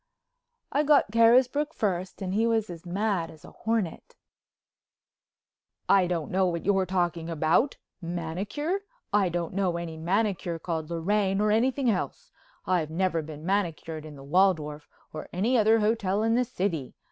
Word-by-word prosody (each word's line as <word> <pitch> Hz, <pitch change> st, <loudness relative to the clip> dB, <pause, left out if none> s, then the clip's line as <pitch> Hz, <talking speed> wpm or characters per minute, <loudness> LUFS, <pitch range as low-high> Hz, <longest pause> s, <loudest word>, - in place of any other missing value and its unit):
I 290 Hz, -, +2 dB
got 295 Hz, -7 st, +4 dB
Carisbrook 250 Hz, +7 st, +4 dB
first 185 Hz, -1 st, -2 dB
and 185 Hz, 0 st, -3 dB
he 225 Hz, +3 st, +2 dB
was 225 Hz, -4 st, 0 dB
as 170 Hz, +1 st, -10 dB
mad 190 Hz, -2 st, -1 dB
as 155 Hz, -, -14 dB
a -, -, -12 dB
hornet. 220 Hz, -7 st, -3 dB, 1.7 s
"I 190 Hz, -2 st, +5 dB
don't 170 Hz, -4 st, -2 dB
know 185 Hz, 0 st, +2 dB
what 170 Hz, -2 st, -3 dB
you're 195 Hz, -1 st, +2 dB
talking 175 Hz, -2 st, -1 dB
about. 165 Hz, -, +2 dB, 0.2 s
Manicure? 180 Hz, -, -3 dB, 0.3 s
I 200 Hz, -3 st, +3 dB
don't 170 Hz, 0 st, -3 dB
know 185 Hz, -3 st, 0 dB
any 165 Hz, -2 st, -5 dB
manicure 180 Hz, 0 st, 0 dB
called 160 Hz, -1 st, -4 dB
Lorraine 195 Hz, +3 st, 0 dB
or 210 Hz, 0 st, +2 dB
anything 255 Hz, +4 st, +2 dB
else. 235 Hz, -, -2 dB, 0.3 s
I've 175 Hz, -4 st, +1 dB
never 170 Hz, 0 st, 0 dB
been 155 Hz, 0 st, -9 dB
manicured 170 Hz, -5 st, -2 dB
in 155 Hz, -1 st, -10 dB
the 135 Hz, -, -11 dB
Waldorf—or 155 Hz, -2 st, -1 dB
any 220 Hz, +8 st, +1 dB
other 220 Hz, -1 st, +4 dB
hotel—in 215 Hz, 0 st, +1 dB
the 250 Hz, +1 st, +2 dB
city. 180 Hz, -, -3 dB
185 Hz, 145 wpm, -27 LUFS, 165-220 Hz, 1.7 s, I